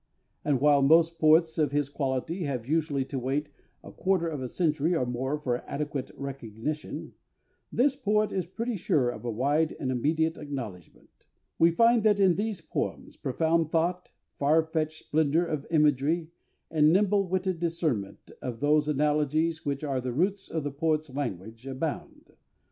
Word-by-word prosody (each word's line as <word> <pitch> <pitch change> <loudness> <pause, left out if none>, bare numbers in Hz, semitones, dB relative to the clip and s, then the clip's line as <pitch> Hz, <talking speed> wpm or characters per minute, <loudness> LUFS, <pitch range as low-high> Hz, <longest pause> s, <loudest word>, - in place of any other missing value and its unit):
And 145 -3 +1
while 145 0 +5
most 165 +3 +4
poets 160 +1 +4
of 150 -3 +2
his 145 -1 +1
quality 140 +5 -2
have 130 -5 -3
usually 150 -3 0
to 135 0 -4
wait 140 +4 -2 0.3
a - - -10
quarter 185 -3 0
of 150 -4 -4
a 130 - -4
century 160 +1 +1
or 130 - +1
more 130 +4 -2
for 125 -5 -1
adequate 145 -2 -3
recognition, 140 +2 -5 0.6
this 275 +2 +2
poet 215 -5 +1
is 185 -3 -2
pretty 230 +5 -3
sure 150 -9 +1
of 110 - -9
a - - -1
wide 145 +8 +1
and 130 - -1
immediate 160 +6 0
acknowledgement.... 120 - -8 0.3
We 165 - +6
find 230 +7 +4
that 210 -1 +3
in 190 -3 +5
these 205 0 -2
poems - - -4
profound 160 +4 0
thought, 175 +3 0 0.3
far 155 +3 +4
fetched 155 -1 -3
splendour 160 +2 +2
of 155 -4 -4
imagery, 155 +1 +2 0.4
and 155 -1 +4
nimble 200 +1 +3
witted 185 -1 -1
discernment 160 - -2
of 120 -3 -5
those 150 +1 +3
analogies 150 +2 +1
which 140 +1 -2
are 135 -3 -1
the 125 -1 -3
roots 190 +8 0
of 160 -2 -2
the 145 - -3
poet's 155 0 -1
language, 115 -2 -5
abound 135 +3 -5
155 Hz, 160 wpm, -28 LUFS, 135-165 Hz, 0.6 s, We